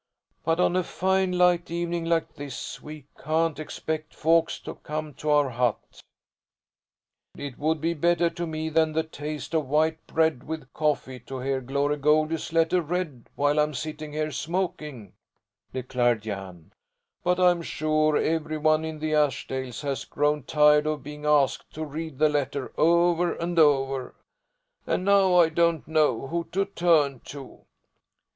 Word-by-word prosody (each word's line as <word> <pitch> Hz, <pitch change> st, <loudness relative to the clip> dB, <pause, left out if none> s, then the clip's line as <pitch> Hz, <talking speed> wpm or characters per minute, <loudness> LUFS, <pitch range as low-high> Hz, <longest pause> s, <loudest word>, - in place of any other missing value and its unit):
"But 165 Hz, +1 st, +1 dB
on 180 Hz, -, +3 dB
a 185 Hz, -, +2 dB
fine 190 Hz, +1 st, 0 dB
light 180 Hz, -1 st, +3 dB
evening 170 Hz, 0 st, -2 dB
like 165 Hz, -1 st, 0 dB
this 140 Hz, -1 st, -7 dB
we 150 Hz, -2 st, -10 dB, 0.2 s
can't 160 Hz, +1 st, 0 dB
expect 155 Hz, 0 st, -5 dB
folks 165 Hz, +1 st, +2 dB
to -, -, -7 dB
come 155 Hz, 0 st, -6 dB
to 150 Hz, -, -5 dB
our 145 Hz, -3 st, +3 dB
hut." 120 Hz, -1 st, -2 dB, 1.4 s
"It 140 Hz, -3 st, -7 dB
would 155 Hz, +2 st, +1 dB
be 165 Hz, +3 st, 0 dB
better 170 Hz, +2 st, +2 dB
to 170 Hz, 0 st, -4 dB
me 160 Hz, 0 st, -3 dB
than 160 Hz, 0 st, +2 dB
the 160 Hz, +1 st, +1 dB
taste 150 Hz, 0 st, -7 dB
of 155 Hz, -4 st, 0 dB
white 155 Hz, +3 st, +1 dB
bread 160 Hz, -5 st, +1 dB
with 155 Hz, -5 st, -6 dB
coffee 145 Hz, -4 st, -1 dB
to 130 Hz, -1 st, -5 dB
hear 135 Hz, 0 st, -1 dB
Glory 140 Hz, +3 st, 0 dB
Goldie's 155 Hz, +2 st, +1 dB
letter 165 Hz, +2 st, +3 dB
read 160 Hz, -6 st, -4 dB
while 145 Hz, +1 st, +2 dB
I'm 150 Hz, -1 st, +1 dB
sitting 155 Hz, +2 st, -5 dB
here 155 Hz, 0 st, -2 dB
smoking," 150 Hz, -, -4 dB, 0.6 s
declared 120 Hz, -3 st, 0 dB
Jan, 95 Hz, -6 st, -7 dB, 0.5 s
"but 180 Hz, +1 st, +1 dB
I'm 180 Hz, -1 st, +4 dB
sure 155 Hz, -1 st, +1 dB
every 155 Hz, -1 st, -1 dB
one 155 Hz, +1 st, +2 dB
in 160 Hz, -1 st, -5 dB
the 155 Hz, 0 st, -2 dB
Ashdales 130 Hz, -4 st, -1 dB
has 140 Hz, -2 st, -3 dB
grown 150 Hz, +1 st, 0 dB
tired 150 Hz, 0 st, +4 dB
of 155 Hz, -3 st, -2 dB
being 150 Hz, +1 st, -7 dB
asked 145 Hz, -3 st, +2 dB
to 155 Hz, +1 st, -4 dB
read 155 Hz, -1 st, -6 dB
the 155 Hz, -, +4 dB
letter 140 Hz, -2 st, -2 dB
over 170 Hz, +1 st, +3 dB
and 170 Hz, 0 st, -1 dB
over, 135 Hz, -3 st, +2 dB, 0.7 s
and 185 Hz, -, 0 dB
now 195 Hz, -2 st, +4 dB
I 170 Hz, -2 st, +6 dB
don't 170 Hz, 0 st, +1 dB
know 150 Hz, -6 st, +2 dB
who 170 Hz, +4 st, -3 dB
to 195 Hz, +2 st, +1 dB
turn 160 Hz, -8 st, +2 dB
to." 140 Hz, -2 st, -10 dB
155 Hz, 155 wpm, -26 LUFS, 145-165 Hz, 1.4 s, I